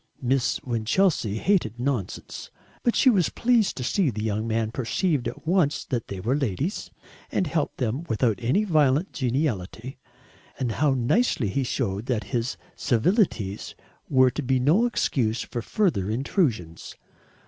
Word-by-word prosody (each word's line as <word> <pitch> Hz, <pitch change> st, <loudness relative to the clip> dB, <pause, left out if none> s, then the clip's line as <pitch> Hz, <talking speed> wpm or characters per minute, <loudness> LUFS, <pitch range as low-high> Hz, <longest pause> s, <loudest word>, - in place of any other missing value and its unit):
Miss 130 Hz, 0 st, +1 dB
Winchelsea 120 Hz, -, +1 dB
hated 125 Hz, -, +1 dB
nonsense, 125 Hz, -7 st, -3 dB, 0.3 s
but 240 Hz, -, +1 dB
she 260 Hz, -, +5 dB
was 185 Hz, -8 st, +2 dB
pleased 235 Hz, -4 st, +2 dB
to 130 Hz, -, -3 dB
see 165 Hz, +6 st, +1 dB
the 105 Hz, -3 st, -4 dB
young 110 Hz, +1 st, -1 dB
man 110 Hz, -1 st, 0 dB
perceived 130 Hz, +4 st, 0 dB
at -, -, -7 dB
once 165 Hz, -4 st, +1 dB
that 120 Hz, -4 st, -3 dB
they 95 Hz, -, -6 dB
were 120 Hz, +8 st, 0 dB
ladies, 140 Hz, -, -2 dB, 0.4 s
and 185 Hz, -, +1 dB
helped 155 Hz, -1 st, -2 dB
them 130 Hz, +6 st, -2 dB
without 115 Hz, -1 st, +1 dB
any 130 Hz, -, +2 dB
violent 155 Hz, -2 st, +2 dB
geniality; 125 Hz, -, -2 dB, 0.6 s
and 125 Hz, -3 st, -1 dB
how 140 Hz, +3 st, +2 dB
nicely 130 Hz, -, +1 dB
he 135 Hz, +8 st, 0 dB
showed 100 Hz, -2 st, -2 dB
that 120 Hz, -4 st, 0 dB
his 120 Hz, +1 st, -1 dB, 0.2 s
civilities 120 Hz, -, 0 dB, 0.3 s
were 130 Hz, -2 st, +5 dB
to 140 Hz, -, -3 dB
be 130 Hz, -1 st, +1 dB
no 165 Hz, -, +3 dB
excuse 120 Hz, -, 0 dB
for 120 Hz, -, -5 dB
further 145 Hz, -, 0 dB
intrusions. 115 Hz, -, -1 dB
130 Hz, 150 wpm, -25 LUFS, 115-160 Hz, 0.6 s, she